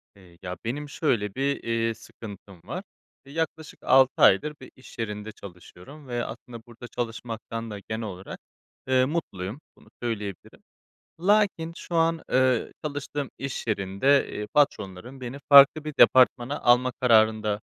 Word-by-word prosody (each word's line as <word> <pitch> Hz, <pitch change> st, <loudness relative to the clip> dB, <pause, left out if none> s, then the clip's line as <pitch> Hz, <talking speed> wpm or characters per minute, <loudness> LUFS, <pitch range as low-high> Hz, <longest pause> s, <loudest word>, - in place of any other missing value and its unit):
Eee, 90 Hz, -3 st, -19 dB
ya, 90 Hz, -1 st, -6 dB
benim 145 Hz, +5 st, -4 dB
şöyle 115 Hz, -10 st, -1 dB
bir, 140 Hz, +1 st, -1 dB
eee, 115 Hz, 0 st, 0 dB
sıkıntım 100 Hz, -5 st, -12 dB
var. 175 Hz, -, -6 dB, 0.4 s
Eee, 140 Hz, -, -13 dB
yaklaşık 160 Hz, -1 st, -4 dB
6 130 Hz, 0 st, +4 dB
aydır 150 Hz, +11 st, +5 dB
bir 130 Hz, -, -12 dB
iş 130 Hz, -, -16 dB
yerinde 105 Hz, -2 st, -4 dB
çalışıyorum 100 Hz, -, -13 dB
ve 120 Hz, -1 st, -2 dB
aslında 115 Hz, +1 st, -9 dB
burada 120 Hz, +1 st, -11 dB
çalışmaktan 115 Hz, -1 st, -5 dB
da 100 Hz, -, -6 dB
genel 110 Hz, +3 st, -5 dB
olarak, 95 Hz, -3 st, -8 dB, 0.5 s
eee, 130 Hz, -1 st, +3 dB
mutluyum, 125 Hz, -, -4 dB, 0.2 s
bunu -, -, -21 dB
söyleyebilirim. 105 Hz, -6 st, -5 dB, 0.6 s
Lakin 195 Hz, -4 st, +2 dB
şu 175 Hz, -, -8 dB
an, 165 Hz, 0 st, +2 dB
eee, 130 Hz, -2 st, +2 dB
çalıştığım 145 Hz, -1 st, -4 dB
iş 135 Hz, -2 st, -5 dB
yerinde, 110 Hz, +7 st, +2 dB
eee, 105 Hz, -, -4 dB
patronlarım 125 Hz, -3 st, 0 dB
beni 125 Hz, +2 st, -6 dB
farklı 140 Hz, +2 st, +8 dB
bir 155 Hz, -, -4 dB
departmana 130 Hz, +1 st, +5 dB
alma 125 Hz, +1 st, +4 dB
kararında 110 Hz, -3 st, +3 dB
120 Hz, 140 wpm, -26 LUFS, 105-140 Hz, 0.6 s, farklı